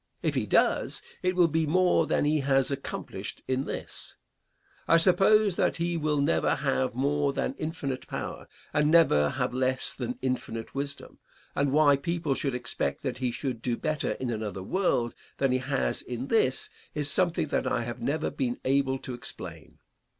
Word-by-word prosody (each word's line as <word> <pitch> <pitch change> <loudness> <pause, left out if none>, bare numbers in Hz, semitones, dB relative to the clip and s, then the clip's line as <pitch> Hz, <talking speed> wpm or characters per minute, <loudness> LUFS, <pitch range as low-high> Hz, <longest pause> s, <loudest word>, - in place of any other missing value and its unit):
If - - +1
he - - -1
does, - - +2 0.2
it 185 0 0
will 175 -2 +5
be 160 0 0
more 180 +3 +3
than - - +1
he 150 +1 +2
has 135 -1 +2
accomplished 140 0 -5
in 130 +1 0
this. - - -7 0.7
I 165 - +6
suppose 195 +3 +5
that - - +1
he 170 +1 -1
will 155 -2 0
never 80 - +2
have 65 - 0
more 140 +2 +1
than - - -1
infinite 145 -5 -4
power - - -5 0.3
and 150 0 +3
never 115 - +5
have - - -2
less 130 0 0
than 250 - -4
infinite 115 -3 -3
wisdom, 140 +1 -5 0.3
and 140 -1 +1
why 145 -1 +5
people 170 -1 -1
should 135 -1 -1
expect 125 0 -2
that 130 -3 -3
he 130 -1 0
should 120 -1 -3
do 120 -1 -1
better 155 -1 -1
in 125 -2 -3
another 105 -4 -4
world 125 - 0 0.2
than 135 -1 +2
he 130 - +2
has 135 +1 -1
in 125 +2 -5
this 130 - +1 0.2
is 150 -1 0
something 170 0 +1
that - - 0
I 120 - +1
have 120 +1 -6
never 155 +6 -1
been 125 -3 -2
able 135 0 +2
to 130 - -7
explain. 120 - -7
140 Hz, 175 wpm, -28 LUFS, 125-155 Hz, 0.7 s, I